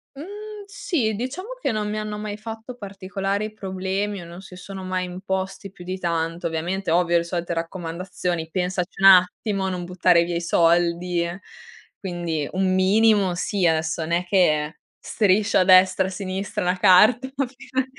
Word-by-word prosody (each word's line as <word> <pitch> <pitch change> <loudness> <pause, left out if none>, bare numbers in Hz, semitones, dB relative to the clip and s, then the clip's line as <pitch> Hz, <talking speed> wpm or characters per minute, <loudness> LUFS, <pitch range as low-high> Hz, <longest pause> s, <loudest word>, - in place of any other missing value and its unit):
Mhmm, 415 +6 -9
sì 340 - -1
diciamo 280 - -5
che - - 0
non 210 -1 -2
mi 215 - -3
hanno 210 0 -4
mai 210 -1 -5
fatto 225 +3 -8
particolari 200 0 -4
problemi 195 0 -3
o - - -10
non 170 +2 -10
si 190 -2 -12
sono 190 0 -8
mai 185 0 -2
imposti 190 +1 -4
più 175 -2 -13
di 185 +1 -4
tanto. 170 0 -2
Ovviamente 170 +3 -2
ovvio, 175 0 +2
le 170 - +1
solite 170 0 -3
raccomandazioni: 170 0 -4
"Pensaci 180 0 -2
un 195 - +7
attimo 190 +2 +4
a - - 0
non 180 -1 -4
buttare 180 -1 +3
via 175 0 -3
i 170 - -1
soldi" 170 +1 +2
e 175 +3 -5 0.6
quindi 170 -5 -3
un 185 0 +1
minimo 195 0 +3
sì, 190 0 -1
adesso 160 0 +1
n'è 170 +2 0
che 155 -5 +2 0.2
striscio 205 0 +2
a - - +5
destra 185 0 +5
e - - -2
a - - -8
sinistra 190 0 -4
una 180 +1 0
carta 210 +7 +5
fino 260 -1 -3
185 Hz, 170 wpm, -23 LUFS, 175-210 Hz, 0.6 s, un